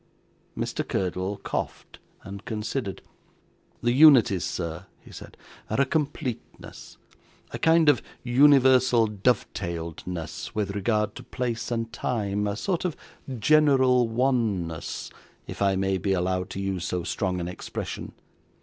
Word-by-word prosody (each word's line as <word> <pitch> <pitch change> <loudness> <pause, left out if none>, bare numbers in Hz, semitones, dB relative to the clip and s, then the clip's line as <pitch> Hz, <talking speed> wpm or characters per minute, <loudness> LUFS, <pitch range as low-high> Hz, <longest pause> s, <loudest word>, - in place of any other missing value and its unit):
Mr. - - -2
Curdle 95 +2 -2
coughed - - -5 0.2
and 100 +1 -8
considered. 110 -1 -4 0.8
'The 120 - +3
unities, 125 - +6
sir,' 85 +1 -4
he - - -16
said, - - -11 0.3
'are - - -1
a - - +4
completeness 140 -4 -4 0.5
a - - -5
kind 165 -1 +4
of 145 -4 +5 0.2
universal 130 -2 +5
dovetailedness 85 -6 -3
with 105 -2 -1
regard 105 +1 0
to - - -9
place 120 -2 -3
and 115 -1 -3
time 105 -4 -1
a 100 - -2
sort 175 - -2
of 180 -4 -2 0.3
a 135 - -5
general 130 -1 +4
oneness, 115 -9 -1 0.3
if - - -8
I 100 -1 +3
may 95 0 0
be 95 0 0
allowed 90 0 -1
to - - -6
use 95 -2 -2
so 90 0 -2
strong 90 0 -2
an 85 - -3
expression. 90 - -6
105 Hz, 130 wpm, -26 LUFS, 95-125 Hz, 0.8 s, unities